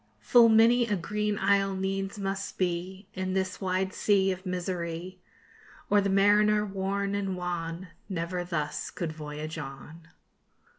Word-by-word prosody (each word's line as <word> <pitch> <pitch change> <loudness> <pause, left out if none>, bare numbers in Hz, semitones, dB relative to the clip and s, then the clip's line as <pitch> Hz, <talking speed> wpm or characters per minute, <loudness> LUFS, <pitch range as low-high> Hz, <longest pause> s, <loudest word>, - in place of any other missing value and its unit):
_Full 235 -2 +7
many 230 +2 +5
a 210 - +1
green 210 +3 -2
isle 195 -1 +2
needs 195 +1 -2
must 195 0 -3
be 185 +2 -2
In 185 0 -3
this 190 0 -2
wide 190 0 0
sea 195 -2 +3
of 185 +1 -6
misery, 180 0 -4 0.7
Or 205 0 +5
the 200 - 0
mariner 210 +2 +4
worn 195 0 -2
and 195 -2 -2
wan 175 0 -4 0.2
Never 175 0 -2
thus 160 -4 -3
could 165 -3 -4
voyage 155 +1 -6
on. 150 +4 -9
190 Hz, 140 wpm, -28 LUFS, 175-200 Hz, 0.7 s, Full